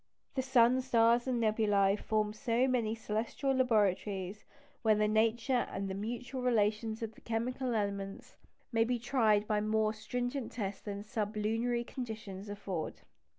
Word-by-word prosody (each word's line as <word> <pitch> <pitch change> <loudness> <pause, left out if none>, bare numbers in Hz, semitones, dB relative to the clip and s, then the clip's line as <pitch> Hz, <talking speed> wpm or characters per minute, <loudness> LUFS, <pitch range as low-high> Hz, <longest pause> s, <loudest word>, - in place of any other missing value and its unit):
The 265 - 0
sun, 255 -1 +4
stars, 235 -1 +3
and 250 -2 +1
nebulæ 210 -3 +3
form 215 -1 0
so 240 +2 +1
many 235 -4 +1
celestial 225 +5 -1
laboratories, 205 -5 +1 0.4
where 220 -2 +4
the 210 0 +2
nature 230 +3 +2
and 195 -1 -3
mutual 240 +5 -4
relations 220 -1 +1
of 225 0 -4
the - - -18
chemical 245 +2 -2
"elements" 200 -2 -3 0.4
may 225 -1 +3
be 245 +2 0
tried 220 -4 +2
by 210 -1 +1
more 215 0 +1
stringent 245 +3 -3
tests 200 -4 -4
than 200 -1 -5
sublunary 220 +3 -1
conditions 215 -6 -6
afford. 195 -5 -4
220 Hz, 140 wpm, -33 LUFS, 210-240 Hz, 0.4 s, sun